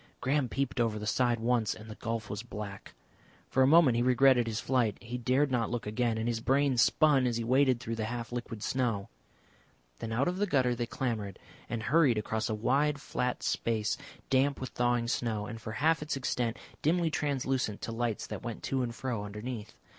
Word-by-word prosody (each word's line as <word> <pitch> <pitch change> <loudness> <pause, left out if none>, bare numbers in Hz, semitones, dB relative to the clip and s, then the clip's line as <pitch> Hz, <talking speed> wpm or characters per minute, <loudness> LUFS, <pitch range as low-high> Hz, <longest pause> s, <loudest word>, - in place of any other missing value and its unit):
Graham 135 -1 +1
peeped 135 +1 -2
over 115 -2 +1
the 105 - -5
side 120 +1 +2
once 115 -1 +1
and 110 - -11
the 110 - -7
gulf 115 -1 -4
was 105 0 -4
black. 105 -4 -8 0.5
For 130 - +1
a 130 - +6
moment 145 -5 +6
he - - +2
regretted 125 -1 +4
his 110 -1 -2
flight. 120 -6 +1
He 120 +2 -6
dared 130 +4 +2
not 120 -3 +1
look 120 -1 -3
again, 115 +2 0
and 110 +1 -2
his 115 -1 0
brain 135 +3 +2
spun 135 +1 +4
as 120 -2 0
he 115 - -2
waded 130 +1 +3
through 115 -2 -4
the 110 - -1
half 120 0 -5
liquid 120 -3 -5
snow. 120 -6 -1 0.9
Then 115 - -5
out 120 +5 +1
of 180 +1 -1
the 205 +1 +1
gutter 130 -7 +2
they 120 0 -2
clambered 110 -7 -3 0.3
and 115 -2 -3
hurried 140 -3 +4
across 110 +1 -1
a 110 - 0
wide 140 +6 +1
flat 125 -3 -2
space 110 -2 0 0.4
damp 135 +2 +3
with 130 - -4
thawing 120 -1 +1
snow, 110 -3 -1
and 115 0 -7
for 110 - -6
half 155 +5 +2
its 150 -2 -2
extent 125 -3 -1 0.2
dimly 165 +1 +2
translucent 135 -7 -1
to - - -3
lights 115 -1 -2
that - - -6
went 120 -2 -6
to 135 -1 0
and 120 -2 -3
fro 120 -6 -3
underneath. 105 +2 -6
120 Hz, 205 wpm, -30 LUFS, 115-130 Hz, 0.9 s, a